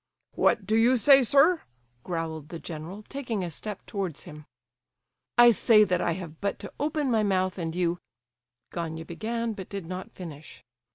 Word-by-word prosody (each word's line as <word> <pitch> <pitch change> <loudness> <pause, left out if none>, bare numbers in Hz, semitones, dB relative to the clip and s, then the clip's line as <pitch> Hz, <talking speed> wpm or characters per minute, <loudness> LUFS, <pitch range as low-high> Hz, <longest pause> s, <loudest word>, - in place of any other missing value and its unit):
"What 210 - +2
do 215 +3 +1
you 240 +3 +5
say, 275 +3 +7
sir?" 285 +8 +4 0.4
growled 160 -3 -4
the 170 - -6
general, 165 +6 -8
taking 240 -6 -4
a 175 - -4
step 205 +5 -7
towards 190 -7 -4
him. 150 -3 -11 0.9
"I 240 0 +9
say 220 -1 +5
that 180 -4 +1
I 170 - +1
have 165 -3 -8
but 200 0 -1
to 200 - -8
open 295 -2 0
my 225 -2 +3
mouth, 185 -2 0
and 165 -1 -3
you—" 175 -1 0 0.7
Gania 160 -1 -4
began, 225 +6 -3
but 190 -3 -8
did 200 -4 -5
not 185 +2 -6
finish. 155 -5 -10
190 Hz, 170 wpm, -27 LUFS, 165-225 Hz, 0.9 s, I